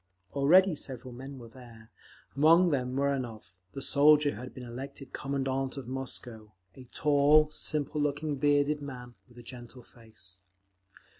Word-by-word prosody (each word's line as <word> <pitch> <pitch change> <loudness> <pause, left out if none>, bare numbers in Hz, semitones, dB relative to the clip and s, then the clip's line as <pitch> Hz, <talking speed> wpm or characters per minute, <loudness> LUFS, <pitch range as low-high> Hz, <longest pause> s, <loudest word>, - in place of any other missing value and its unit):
Already 170 +7 +5
several 130 -4 -6
men 135 +3 -9
were 120 -2 -11
there, 115 -2 -15 0.4
among 165 +5 +5
them 130 -2 -1
Muranov, 130 -8 -2 0.2
the 135 - -6
soldier 145 0 +4
who - - -9
had 130 - -8
been 130 - -10
elected 130 +2 -9
Commandant 135 -1 -2
of 130 -3 -7
Moscow—a 115 -5 -8
tall, 150 +3 +3
simple 150 -1 -2
looking, 145 0 -1
bearded 145 +1 +2
man 125 -3 -8 0.2
with 120 - -20
a 120 - -11
gentle 120 0 -11
face. 110 -7 -15
135 Hz, 140 wpm, -29 LUFS, 120-145 Hz, 0.4 s, Already